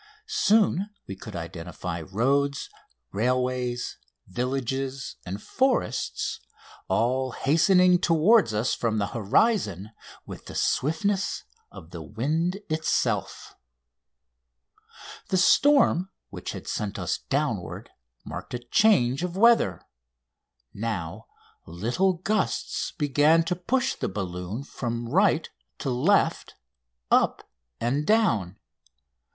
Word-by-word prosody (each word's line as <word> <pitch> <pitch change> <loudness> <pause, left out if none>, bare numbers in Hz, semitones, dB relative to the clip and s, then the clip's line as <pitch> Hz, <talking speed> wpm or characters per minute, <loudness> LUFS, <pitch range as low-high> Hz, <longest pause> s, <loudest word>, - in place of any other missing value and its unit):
Soon 220 - +2 0.2
we 95 - -7
could 105 +1 -10
identify 85 0 -6
roads, 140 - 0 0.4
railways, 125 +2 -1 0.3
villages, 130 +4 -3
and 95 +3 -4
forests, 260 - -1 0.5
all 130 +2 0
hastening 180 +4 +4
toward 175 - +4
us 110 +4 0
from 115 -2 -1
the 100 -1 -1
horizon 110 - +1 0.3
with - - -10
the - - -9
swiftness 190 +7 0 0.3
of - - -12
the - - -7
wind 165 - -2
itself. 155 0 -1 1.8
The 190 - +2
storm 195 - +4 0.2
which - - -6
had - - -9
sent 105 -2 -3
us - - -2
downward - - -3 0.3
marked - - -6
a 120 0 -7
change 140 - +4
of 180 0 -3
weather. 220 - +4 0.9
Now 105 -2 -4 0.4
little 120 - 0
gusts 195 +4 -1
began 150 +2 +4
to 170 +2 -1
push 240 +9 0
the - - -3
balloon 95 +4 -5
from 120 -4 -4
right 170 +1 +3 0.3
to 135 - -3
left, 150 +12 +1 0.6
up - - +2 0.3
and 130 +5 0
down. 110 - +2
135 Hz, 100 wpm, -26 LUFS, 110-180 Hz, 1.8 s, hastening